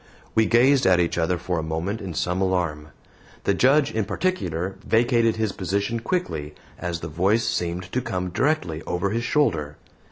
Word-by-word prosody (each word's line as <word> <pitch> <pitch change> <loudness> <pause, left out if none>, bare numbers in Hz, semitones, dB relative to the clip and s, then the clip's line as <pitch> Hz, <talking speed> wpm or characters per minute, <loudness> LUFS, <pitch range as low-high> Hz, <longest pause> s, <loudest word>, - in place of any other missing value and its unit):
We 110 -1 +3
gazed 125 +2 +4
at 90 -1 +5
each 85 0 +1
other 85 +2 +1
for 90 0 -2
a - - -1
moment 80 +7 -3
in 90 -5 -6
some 90 +3 -1
alarm. 85 -5 0 0.6
The 100 - +2
Judge, 135 +6 +3
in 110 - 0
particular, 95 - -2
vacated 115 0 +3
his 110 -2 -1
position 100 +5 -2
quickly, 80 - -3 0.2
as 85 -1 -3
the 85 - -4
voice 95 +9 +1
seemed 90 +1 -2
to 125 - 0
come 90 -7 -3
directly 130 - 0
over 90 +3 -1
his 115 +2 -1
shoulder. 75 - 0
95 Hz, 170 wpm, -24 LUFS, 85-115 Hz, 0.6 s, at